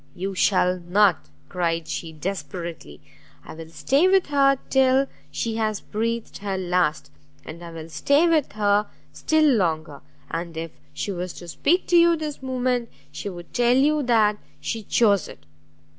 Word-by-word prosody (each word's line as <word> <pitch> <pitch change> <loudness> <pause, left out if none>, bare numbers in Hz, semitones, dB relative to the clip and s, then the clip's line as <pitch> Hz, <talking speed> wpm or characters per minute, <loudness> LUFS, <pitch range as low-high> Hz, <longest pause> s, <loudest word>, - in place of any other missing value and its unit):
"You 195 +2 -4
shall 185 -1 +2
not!" 180 - +2 0.2
cried 165 -2 -2
she, 165 - -5
desperately, 165 - -6 0.4
"I - - -9
will 160 0 -10
stay 270 - +2
with 380 0 +4
her 275 -1 +4
till 265 0 +4 0.2
she 225 -1 -3
has 215 -2 -1
breathed 230 +1 -3
her 195 -1 -3
last, 175 -6 0 0.3
and 170 +2 -9
I 170 - -8
will 165 -1 -8
stay 285 - +2
with 315 -9 +1
her 205 0 +2 0.3
still 315 0 +2
longer! 165 - +1 0.3
and 165 0 -4
if 165 0 -5 0.2
she 205 - -4
was 180 -1 -4
to 175 - -11
speak 340 - +1
to 350 - +5
you 340 0 +6
this 305 -3 -5
moment, 250 -2 -1 0.2
she 205 - -5
would 175 -2 -10
tell 245 +1 +3
you 300 +3 +3
that 220 -5 +2 0.2
she 225 - -4
chose 205 -2 +2
it. 80 - -13
205 Hz, 160 wpm, -23 LUFS, 170-260 Hz, 0.4 s, you